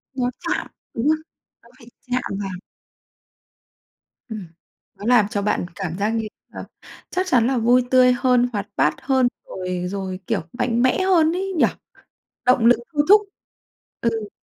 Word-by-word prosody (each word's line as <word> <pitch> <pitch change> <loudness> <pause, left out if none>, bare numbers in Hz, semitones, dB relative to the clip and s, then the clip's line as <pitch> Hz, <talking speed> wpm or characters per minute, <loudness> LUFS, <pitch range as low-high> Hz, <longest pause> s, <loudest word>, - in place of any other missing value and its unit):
Nó 250 -2 0
chạm, - - -2 0.3
đúng 235 +4 -1
hông? 310 +1 +4 0.5
Nó 235 - -20
phải 235 - -16 0.2
chạm 250 0 +1 0.2
vào. 190 -3 -5 1.7
Ừm, 215 -6 -7 0.5
nó 205 - -9
làm 235 -3 +5
cho 205 -1 -2
bạn 200 -3 0
cảm 180 -3 -4
giác 205 +2 0
như 225 -1 -1 0.3
là - - -6 0.5
chắc 370 +1 -1
chắn 245 -9 +3
là 265 0 +1
vui 240 +2 +4
tươi 255 -1 +6
hơn, 250 -1 +2
hoạt 205 -2 -3
bát 150 0 +2
hơn 260 -2 +2 0.2
rồi 180 -1 -4
rồi, 190 -1 -4
kiểu, - - 0
mạnh 240 -1 0
mẽ 255 +8 +3
hơn 340 -4 +4
ấy 385 +1 -2
nhỉ, - - +5 0.8
động 250 -2 +4
lực 245 - +6
thôi 295 -1 +2
thúc. 415 +2 +8 0.8
Ừ. 225 -2 -1
240 Hz, 160 wpm, -22 LUFS, 205-255 Hz, 1.7 s, thúc